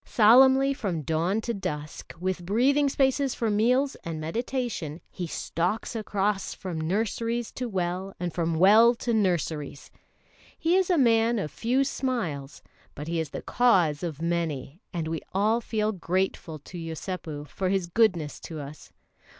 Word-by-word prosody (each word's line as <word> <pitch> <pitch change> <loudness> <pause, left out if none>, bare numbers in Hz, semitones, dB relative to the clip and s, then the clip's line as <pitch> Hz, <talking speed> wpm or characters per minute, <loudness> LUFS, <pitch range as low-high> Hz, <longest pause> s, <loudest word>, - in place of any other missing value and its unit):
Solemnly 265 +5 +6
from 185 - -3
dawn 170 +8 0
to 235 +1 -2
dusk, 150 -7 -6
with 185 0 -2
breathing 270 +9 +3
spaces 270 0 +1
for 225 -2 0
meals 250 +7 +2
and 165 -2 -4
meditation, 195 - -3
he 180 -2 -5
stalks 180 +8 -2
across 205 -2 -1
from 175 -4 -5
nurseries 230 +6 -1
to 250 -1 -4
well 185 0 -2
and 175 -2 -3
from 165 -1 0
well 215 +7 +6
to 235 0 -2
nurseries. 165 -8 -1 0.7
He 330 +3 +2
is 375 -1 +2
a 355 - +3
man 230 -3 +4
of 175 -8 -3
few 250 +4 +1
smiles; 185 - -3 0.3
but 150 +2 -7
he 165 0 -1
is 160 -3 -2
the - - -7
cause 180 -12 +3
of 160 -3 -4
many, 165 - -2
and 165 -3 -3
we 160 0 -3
all 215 +4 +2
feel 215 -1 -1
grateful 185 -3 -2
to 170 +4 -10
Yosépu 160 -2 -5
for 185 +7 -2
his 190 -2 +1
goodness 170 -5 +1
to 160 -2 -7
us. 145 +1 -10
190 Hz, 155 wpm, -27 LUFS, 165-235 Hz, 0.7 s, Solemnly